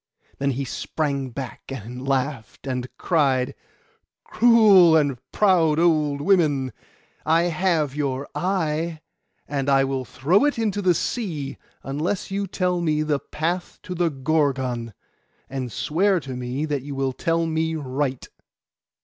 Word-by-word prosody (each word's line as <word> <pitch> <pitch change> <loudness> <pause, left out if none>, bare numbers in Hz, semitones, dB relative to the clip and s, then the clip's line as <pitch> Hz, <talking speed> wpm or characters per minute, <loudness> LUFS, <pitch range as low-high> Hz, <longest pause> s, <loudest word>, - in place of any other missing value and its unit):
Then 140 0 +1
he 140 - -2
sprang 140 -2 -2
back, 130 +2 -7
and 125 +1 -7
laughed, 135 -3 -2
and 125 -2 -2
cried— 135 -7 +1 0.7
'Cruel 210 -8 +6
and 140 -5 +1
proud 170 -7 +3
old 155 -4 +2
women, 145 -8 +2 0.5
I 165 +2 +3
have 170 -4 +1
your 140 -2 -2
eye; 165 -3 -1 0.5
and 140 -1 -1
I 135 -1 +5
will 135 -1 -1
throw 155 - +2
it 290 - +1
into 210 -3 0
the 180 -3 +3
sea, 155 - -3 0.3
unless 155 +9 -2
you 200 0 -1
tell 180 -1 0
me 155 -2 +1
the 150 -2 0
path 170 +5 -3
to 180 - -5
the 175 -1 +1
Gorgon, 130 -6 -1 0.5
and 130 -2 -4
swear 185 - +1
to 135 -3 -6
me 125 +4 -3
that 145 -3 -2
you 135 -1 -2
tell 165 +3 0
me 160 0 -1
right. 135 -2 -2
150 Hz, 135 wpm, -23 LUFS, 135-170 Hz, 0.7 s, Cruel